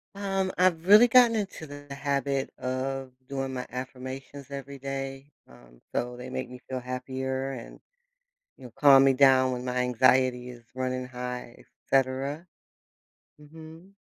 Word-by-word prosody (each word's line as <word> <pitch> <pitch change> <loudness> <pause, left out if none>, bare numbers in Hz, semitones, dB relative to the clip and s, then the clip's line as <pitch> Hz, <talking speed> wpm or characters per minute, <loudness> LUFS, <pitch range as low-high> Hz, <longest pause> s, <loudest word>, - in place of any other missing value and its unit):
Um, 195 -1 -1
I've 175 -3 +3
really 210 +5 +8
gotten 240 -1 +6
into 195 -6 -4
the 145 -1 -11
habit 140 -1 -1
of 130 +1 -3
doing 135 -1 -3
my 125 - -4
affirmations 130 +2 -7
every 140 0 -7
day, 135 +1 -6 0.2
um, - - -18
so 125 0 -2
they 125 +1 -8
make 130 -1 -5
me 125 - -9
feel 130 - -3
happier 130 +1 -4
and, 120 - -9 0.8
you 135 - -16
know, 125 - -10
calm 135 -2 +7
me 135 - +6
down 130 -1 +5
when 125 0 -4
my 125 0 -3
anxiety 125 0 +2
is 120 -1 -11
running 130 0 -2
high, 125 -1 -7 0.2
etcetera. 135 +5 0 0.9
Mhm. 160 +4 -13
135 Hz, 145 wpm, -27 LUFS, 130-145 Hz, 0.9 s, really